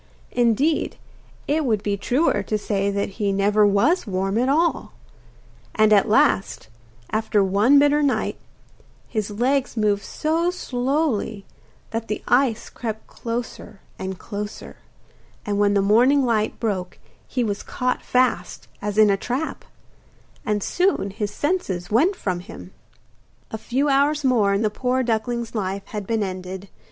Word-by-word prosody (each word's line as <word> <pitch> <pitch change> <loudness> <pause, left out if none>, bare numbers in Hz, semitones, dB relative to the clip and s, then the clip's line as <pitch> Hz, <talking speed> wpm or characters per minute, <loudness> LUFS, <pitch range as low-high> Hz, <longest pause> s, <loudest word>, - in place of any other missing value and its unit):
Indeed, 245 +6 +1 0.5
it 305 +2 +1
would 220 -6 0
be 205 -1 0
truer 255 +10 +1
to 215 - -2
say 200 -1 -1
that 200 +1 -3
he 200 -1 +2
never 205 +2 +3
was 235 - +2
warm 195 +2 -1
at 255 +2 +1
all; 330 +4 +1 0.8
and 215 0 +5
at 205 +1 +4
last, 220 - +2 0.4
after 215 -2 +1
one 205 +9 +4
bitter 290 +1 +4
night, 285 -2 0 0.7
his 215 -3 -2
legs 250 +4 0
moved 205 -2 +2
so 325 +3 0
slowly 250 - -1 0.5
that 225 0 -3
the 215 - -4
ice 245 -3 +2
crept 220 -2 -6
closer 230 -3 -6 0.2
and 190 0 -4
closer, 205 +1 -7 0.7
and 205 -1 -1
when 205 0 +3
the 200 - +3
morning 250 +7 +4
light 220 -3 0
broke 190 -5 -3 0.3
he 250 - -1
was 205 -3 -2
caught 250 0 -2
fast, 255 0 0
as 205 0 -3
in 215 -2 +6
a 195 - +2
trap; 255 +9 -3 0.8
and 210 -2 -1
soon 360 - +1
his 205 +1 -3
senses 205 - -2
went 320 - +3
from 185 - -2
him. 90 - -11 0.8
A 220 - -3
few 270 +7 0
hours 285 +2 +2
more 235 -7 +3
and 200 +3 +1
the 210 - +1
poor 255 +3 0
duckling's 235 0 -2
life 195 -2 -3
had 205 -1 -6
been 225 -2 0
ended. 185 0 -6
220 Hz, 145 wpm, -22 LUFS, 200-260 Hz, 0.8 s, in